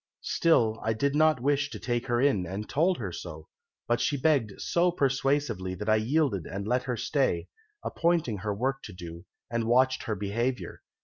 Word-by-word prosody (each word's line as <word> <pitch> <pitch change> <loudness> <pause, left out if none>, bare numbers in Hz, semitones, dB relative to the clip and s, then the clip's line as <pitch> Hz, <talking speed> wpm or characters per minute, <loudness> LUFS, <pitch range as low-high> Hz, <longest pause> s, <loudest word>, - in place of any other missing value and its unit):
"'Still, 115 -10 +2
I 110 - +1
did 140 +5 0
not 155 -4 +3
wish 145 +1 +1
to - - -7
take 120 0 -2
her 120 -1 +1
in, 120 -10 +2
and 100 +4 -5
told 175 +6 +2
her 100 -7 -4
so, 80 -2 -8 0.4
but 120 0 +1
she 145 - +1
begged 130 -8 +1
so 175 +1 +2
persuasively 135 - 0
that 105 +3 -6
I 110 - +5
yielded 120 - +1
and 100 +1 -5
let 125 +2 +2
her 125 -3 -2
stay, 130 - 0 0.3
appointed 165 -10 0
her 105 +1 -2
work 130 +6 -1
to 105 - -9
do, 85 0 -9 0.3
and 115 -1 0
watched 130 +2 +3
her 110 - -1
behaviour. 115 +6 -2
120 Hz, 185 wpm, -28 LUFS, 105-140 Hz, 0.4 s, I